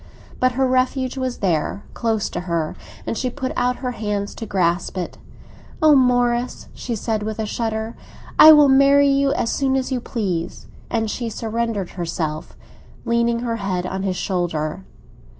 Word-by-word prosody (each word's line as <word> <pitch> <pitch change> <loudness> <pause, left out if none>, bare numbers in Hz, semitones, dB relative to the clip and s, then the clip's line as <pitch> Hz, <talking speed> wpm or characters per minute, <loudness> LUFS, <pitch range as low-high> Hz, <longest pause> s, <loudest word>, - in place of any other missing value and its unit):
But 255 0 +2
her 265 +2 +1
refuge 255 0 0
was 260 -2 -3
there, 175 +3 0
close 225 -3 0
to - - -3
her, 165 -2 -1 0.3
and - - -2
she 255 +3 -1
put 260 +1 -4
out 250 0 +1
her 250 - 0
hands 205 -3 -3
to 225 - -7
grasp 180 -1 0
it. 180 - -5 0.6
"Ah, 310 -1 +5
Morris," 245 -2 +2
she 240 - -4
said, 220 0 -2
with 215 0 -4
a 220 - -2
shudder, 220 +1 -3 0.4
"I 315 - +11
will 295 -2 +7
marry 275 +1 +5
you 275 0 +2
as 230 - -1
soon 265 -1 +1
as 265 0 -1
you 255 -2 -1
please." 185 -9 -3 0.2
And 225 -1 0
she 235 -2 -3
surrendered 225 -3 -3
herself, 165 -3 -4 0.5
leaning 235 0 +1
her 230 -2 -2
head 185 -3 -2
on 190 +1 -3
his 190 -1 -1
shoulder. 175 -2 -2
230 Hz, 170 wpm, -21 LUFS, 190-255 Hz, 0.6 s, I